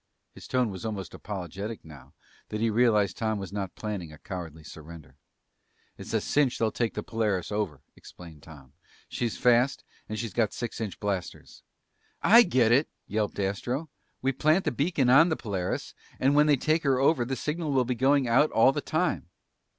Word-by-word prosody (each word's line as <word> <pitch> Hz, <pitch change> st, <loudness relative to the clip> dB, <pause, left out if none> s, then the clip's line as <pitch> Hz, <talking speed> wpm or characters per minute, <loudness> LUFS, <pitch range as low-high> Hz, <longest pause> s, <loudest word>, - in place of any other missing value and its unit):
His -, -, -12 dB
tone 125 Hz, -4 st, +1 dB
was 95 Hz, +1 st, -8 dB
almost 105 Hz, -4 st, -5 dB
apologetic 100 Hz, +2 st, -6 dB
now 75 Hz, -5 st, -14 dB, 0.4 s
that 105 Hz, -, -4 dB
he 115 Hz, 0 st, +1 dB
realized 105 Hz, -4 st, +3 dB
Tom 110 Hz, -1 st, -1 dB
was 95 Hz, -1 st, -7 dB
not 100 Hz, -3 st, -4 dB
planning 100 Hz, -7 st, -5 dB
a 75 Hz, -, -12 dB
cowardly 80 Hz, -3 st, -8 dB
surrender. 75 Hz, -2 st, -12 dB, 0.8 s
"It's 110 Hz, -, -9 dB
a -, -, +3 dB
cinch 135 Hz, +3 st, +1 dB
they'll 110 Hz, -1 st, +1 dB
take 115 Hz, -2 st, -2 dB
the 105 Hz, -, -3 dB
Polaris 105 Hz, -6 st, -1 dB
over," 100 Hz, -9 st, -3 dB
explained 80 Hz, -4 st, -13 dB
Tom. 70 Hz, -5 st, -15 dB, 0.4 s
"She's 120 Hz, -3 st, -2 dB
fast 125 Hz, +2 st, +3 dB, 0.3 s
and 110 Hz, -, -4 dB
she's 115 Hz, -3 st, -4 dB
got 115 Hz, -3 st, +1 dB
six 120 Hz, -1 st, -5 dB
inch 105 Hz, -4 st, -5 dB
blasters." 100 Hz, -3 st, -5 dB, 0.6 s
"I 230 Hz, +3 st, +8 dB
get 130 Hz, -, +3 dB
it!" 135 Hz, +6 st, +3 dB, 0.2 s
yelped 105 Hz, 0 st, -2 dB
Astro. 120 Hz, +10 st, -2 dB, 0.3 s
"We 135 Hz, -, +2 dB
plant 155 Hz, +7 st, +2 dB
the -, -, +1 dB
beacon 140 Hz, 0 st, 0 dB
on 145 Hz, +8 st, +6 dB
the 160 Hz, -, -1 dB
Polaris, 95 Hz, -5 st, -3 dB, 0.3 s
and 135 Hz, +2 st, +3 dB
when 150 Hz, +1 st, +5 dB
they 145 Hz, -2 st, +4 dB
take 155 Hz, +5 st, +1 dB
her 135 Hz, -4 st, +2 dB
over, 135 Hz, 0 st, +3 dB
the 130 Hz, +3 st, -3 dB
signal 155 Hz, +2 st, -3 dB
will 130 Hz, -2 st, +2 dB
be 125 Hz, -, -1 dB
going 135 Hz, +2 st, +2 dB
out 130 Hz, +6 st, +4 dB
all 115 Hz, +4 st, +5 dB
the 145 Hz, -, -3 dB
time." 160 Hz, -, -1 dB
115 Hz, 185 wpm, -27 LUFS, 95-135 Hz, 0.8 s, I